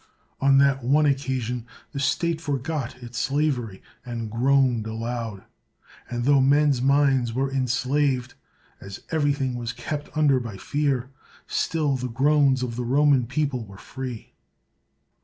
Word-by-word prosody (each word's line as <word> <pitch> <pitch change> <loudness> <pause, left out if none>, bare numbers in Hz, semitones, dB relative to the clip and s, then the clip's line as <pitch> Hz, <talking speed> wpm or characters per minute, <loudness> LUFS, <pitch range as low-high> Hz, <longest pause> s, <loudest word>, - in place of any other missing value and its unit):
On 135 0 +4
that 135 -1 +3
one 145 +5 +3
occasion 130 -4 -1 0.2
the 140 - -5
state 160 +4 0
forgot 140 -3 -3
its 120 0 -6
slavery, 135 -8 -1 0.2
and 115 -3 -5
groaned 125 -1 +2
aloud; 115 -2 -4 0.7
and 120 0 -3
tho 140 -1 +5
men's 140 -1 +3
minds 135 -3 +3
were 135 +2 -1
enslaved, 130 0 0 0.5
as 100 0 -10
everything 145 -4 0
was 120 -1 -4
kept 145 +4 -5
under 145 -4 +4
by 115 -5 -7
fear, 140 -1 -1 0.3
still 150 -4 0
the 125 0 -4
groans 135 +1 +3
of 120 -2 -4
the 125 - -2
Roman 135 0 +3
people 135 -2 -1
were 100 -2 -13
free. 125 0 -7
130 Hz, 135 wpm, -24 LUFS, 120-145 Hz, 0.7 s, tho